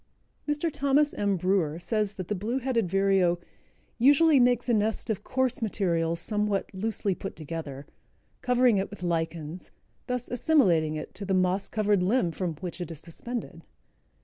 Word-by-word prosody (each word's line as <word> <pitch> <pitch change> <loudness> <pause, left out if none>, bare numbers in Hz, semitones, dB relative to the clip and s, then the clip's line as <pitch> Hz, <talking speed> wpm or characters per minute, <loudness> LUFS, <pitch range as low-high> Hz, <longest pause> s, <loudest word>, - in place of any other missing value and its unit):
Mr. 295 +3 0
Thomas 285 +1 +2
M. 200 -2 0
Brewer 180 -4 +1
says 210 +3 -1
that 185 -2 -6
the - - -1
Blue 215 +6 -2
headed 240 -7 0
Vireo 195 -2 +3 0.6
"usually 285 +4 +6
makes 245 -1 +3
a 240 - +2
nest 220 +1 0
of 210 - -4
coarse 260 0 -1
materials 170 -6 0
somewhat 210 -2 -1
loosely 200 0 -1
put 195 - -7
together, 155 -3 -6 0.6
covering 250 -3 +3
it 195 - -2
with 205 -2 -10
lichens, 165 -1 -3 0.4
thus 250 -1 -2
assimilating 190 - +2
it 155 - -6
to 200 - -6
the 195 -1 0
moss 185 +1 +1
covered 210 -3 +1
limb 190 -1 +2
from 170 -1 -3
which 180 0 -5
it 175 - -4
is 165 -3 -7
suspended." 230 +9 -6
200 Hz, 160 wpm, -27 LUFS, 175-245 Hz, 0.6 s, usually